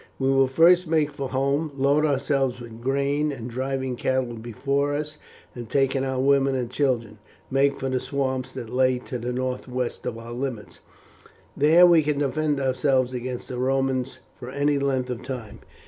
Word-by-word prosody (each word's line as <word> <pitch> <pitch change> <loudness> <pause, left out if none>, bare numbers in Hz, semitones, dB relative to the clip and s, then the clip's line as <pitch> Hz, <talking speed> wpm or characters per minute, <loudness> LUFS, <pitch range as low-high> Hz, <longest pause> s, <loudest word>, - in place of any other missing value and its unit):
We 135 0 0
will 135 0 +4
first 170 +6 +5
make 155 -2 +1
for 140 -2 -5
home, 140 +4 0
load 140 +3 +3
ourselves 135 -2 0
with 115 -1 -10
grain, 140 +3 0
and 120 -4 -6
driving 130 +1 -3
cattle 130 -1 -1
before 140 +5 -1
us, 150 +1 -5 0.3
and 120 -3 -8
taking 135 0 +1
our 130 -1 -2
women 135 0 +3
and 125 -2 -3
children, 120 -6 -1 0.3
make 140 +1 +2
for 135 - -2
the 130 -1 0
swamps 130 0 -2
that 115 - -7
lie 130 0 +2
to 125 0 -6
the 120 +2 -3
northwest 125 0 -3
of 115 - -3
our 115 +1 -9
limits. 125 -4 -5 0.8
There 160 +5 +6
we 170 -2 +6
can 150 -1 -1
defend 145 +1 0
ourselves 130 -1 +1
against 125 0 -5
the 125 - -5
Romans 135 0 0 0.2
for 120 - -7
any 145 +2 +1
length 130 -2 -1
of 125 -1 -5
time." 125 -4 -7
135 Hz, 175 wpm, -24 LUFS, 125-140 Hz, 0.8 s, There